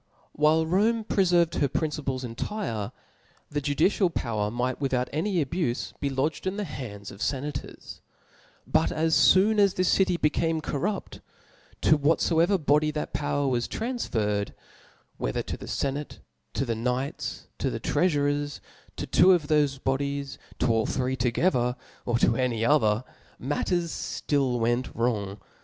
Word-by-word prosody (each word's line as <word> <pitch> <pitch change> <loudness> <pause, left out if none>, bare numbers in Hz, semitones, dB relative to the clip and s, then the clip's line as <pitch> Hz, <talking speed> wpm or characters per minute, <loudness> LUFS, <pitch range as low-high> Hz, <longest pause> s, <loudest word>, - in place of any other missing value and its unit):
While 155 +2 +3
Rome 215 +7 +2
prefervcd 175 -5 +2
her 145 - +3
principles 140 -2 -2
intire, 115 - -4 0.6
the 145 0 -1
judicial 160 +7 +2
power 110 -9 -2
might 125 +4 -2
without 130 -2 0
any 170 0 0
abufe 140 -4 -2
be 140 - -1
lodged 140 +7 -1
in 190 +2 -2
the 210 - -1
hands 110 - -7
of 100 - -12
fenators: 145 +4 -4 0.7
but - - +2
as 160 +1 +4
foon 210 +3 +4
as 200 -2 +4
this 185 -1 +2
city 185 -2 +3
became 160 +1 +1
corrupt, 180 +7 -3 0.6
to 155 - +5
whatfoever 165 +5 +3
body 150 -1 +2
that 150 0 -4
power 145 -1 0
was 120 -2 0
transferred, 110 - -2 0.6
whether - - -2
to - - -4
the - - -10
fcnatc, 140 +1 -3 0.4
to 135 - 0
the 115 - -1
knights, 125 +4 -3
to - - 0
the - - -4
treafurers, 145 -4 0 0.4
to - - -4
two 185 +1 +6
of 170 -4 +1
thofc 145 -3 +1
bodies^ 140 +1 -2 0.2
to - - 0
all 110 -1 +1
three 130 0 -1
togethtfr, 125 0 +1 0.3
or 120 -1 +2
to 115 -1 +3
any 115 -3 0
others 115 -5 +3 0.4
tnatters 170 +5 -2
ftill 135 -4 +1
went 120 +2 0
wrong. 105 -4 -1
145 Hz, 145 wpm, -27 LUFS, 125-165 Hz, 0.7 s, two